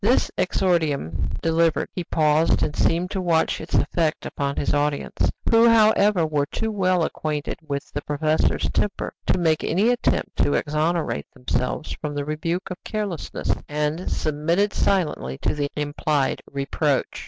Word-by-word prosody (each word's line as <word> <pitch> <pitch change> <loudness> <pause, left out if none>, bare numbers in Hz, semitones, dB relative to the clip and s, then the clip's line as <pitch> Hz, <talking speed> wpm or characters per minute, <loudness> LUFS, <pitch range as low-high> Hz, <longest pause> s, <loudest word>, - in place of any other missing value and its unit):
This 240 +5 +3
exordium 155 - 0
delivered, 165 0 +2
he 180 - -3
paused 155 0 +2
and 150 - -1
seemed 175 +3 +1
to 190 - -2
watch 165 -3 +1
its - - -4
effect 155 +1 +1
upon 140 0 -2
his - - 0
audience, 145 0 0 0.2
who, 230 +1 +6
however, 210 -5 +4
were 150 -2 0
too 220 +7 -3
well 185 -4 +2
acquainted 150 -2 -3
with 140 -1 -4
the 145 - -2
professor's 155 +2 0
temper 205 - -1
to - - +3
make 160 -3 +1
any 195 +8 +2
attempt 245 0 0
to - - +2
exonerate 155 - 0
themselves 65 0 -2
from 150 -1 -3
the 145 -1 -2
rebuke 165 +5 -3
of 180 - -7
carelessness, 205 -7 -2 0.2
and 150 +4 -2
submitted 165 +7 0
silently 150 - 0
to - - -1
the 145 -1 -2
implied 145 -1 0
reproach. 140 0 -1
155 Hz, 150 wpm, -23 LUFS, 145-180 Hz, 0.2 s, who